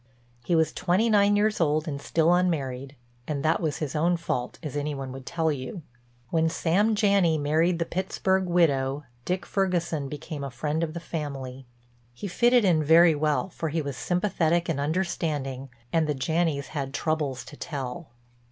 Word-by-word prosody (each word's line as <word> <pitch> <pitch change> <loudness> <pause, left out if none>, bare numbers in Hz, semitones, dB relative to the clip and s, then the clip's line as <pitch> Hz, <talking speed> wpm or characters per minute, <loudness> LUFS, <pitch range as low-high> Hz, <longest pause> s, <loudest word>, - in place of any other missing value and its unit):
He 170 - +1
was 160 -1 +2
twenty 190 +6 +1
nine 205 -1 +5
years 210 -1 +1
old 155 0 +1
and 140 -2 -4
still 165 +3 +2
unmarried, 140 -7 -1 0.3
and 145 -2 -2
that 160 - +2
was 155 -2 -1
his 155 -4 -4
own 170 +3 +2
fault 125 -7 -3
as 150 -2 -5
any 145 0 -2
one 135 -1 -5
would 130 0 -9
tell 160 -1 0
you. 145 +5 -5 0.5
When 160 0 +2
Sam 195 +6 +2
Janney 200 -6 +3
married 160 +4 +2
the 170 - -1
Pittsburg 190 +1 0
widow 145 -5 +2 0.2
Dick 180 +1 -1
Ferguson 170 -7 -1
became 150 0 -6
a 140 - -3
friend 150 +6 -2
of 160 0 -3
the - - -3
family. 135 -6 -6 0.5
He 200 - -5
fitted 240 +4 +4
in 165 -4 +3
very 165 +2 +6
well, 150 +4 0
for 165 -2 -4
he 160 +1 -1
was 140 -2 -4
sympathetic 175 -2 0
and 160 -5 -1
understanding 145 -4 -2 0.2
and 165 -2 +2
the 150 - 0
Janneys 160 0 0
had 140 -2 -4
troubles 145 -7 -1
to 145 - -11
tell. 140 0 -5
160 Hz, 175 wpm, -26 LUFS, 145-175 Hz, 0.5 s, very